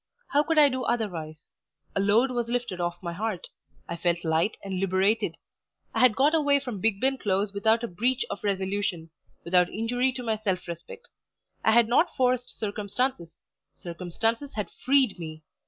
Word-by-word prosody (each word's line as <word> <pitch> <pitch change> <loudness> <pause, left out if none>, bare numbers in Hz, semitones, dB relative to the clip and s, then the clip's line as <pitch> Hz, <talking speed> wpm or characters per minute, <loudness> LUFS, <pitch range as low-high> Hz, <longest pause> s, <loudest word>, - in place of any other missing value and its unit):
How 290 - +4
could 325 +1 -1
I 295 -1 +8
do 260 -1 -2
otherwise? 170 -10 -3 0.4
A - - +1
load 215 +6 +3
was 240 -2 -2
lifted 240 -7 -2
off 175 +1 -3
my 170 -1 -3
heart; 210 0 -3 0.4
I 170 - -4
felt 170 0 0
light 160 +6 +1
and 190 -2 -3
liberated. 195 +3 +1 0.6
I - - -1
had 250 -4 +5
got 285 +4 +3
away 285 -3 +3
from 245 -8 -6
Bigben 225 +6 +1
Close 195 0 0
without 220 +3 +2
a - - -1
breach 245 +8 0
of 200 - -6
resolution; 190 -4 -1 0.3
without 180 0 +3
injury 245 +4 0
to 250 -1 -6
my 220 -2 0
self 190 -5 -2
respect. 455 - -8 0.6
I 220 - +4
had 235 -1 +5
not 250 +9 +2
forced 250 -1 +1
circumstances; 205 -3 -3 0.4
circumstances 205 +10 -3
had 210 -2 -3
freed 260 -8 +2
me. 155 -2 -7
215 Hz, 170 wpm, -27 LUFS, 180-250 Hz, 0.6 s, I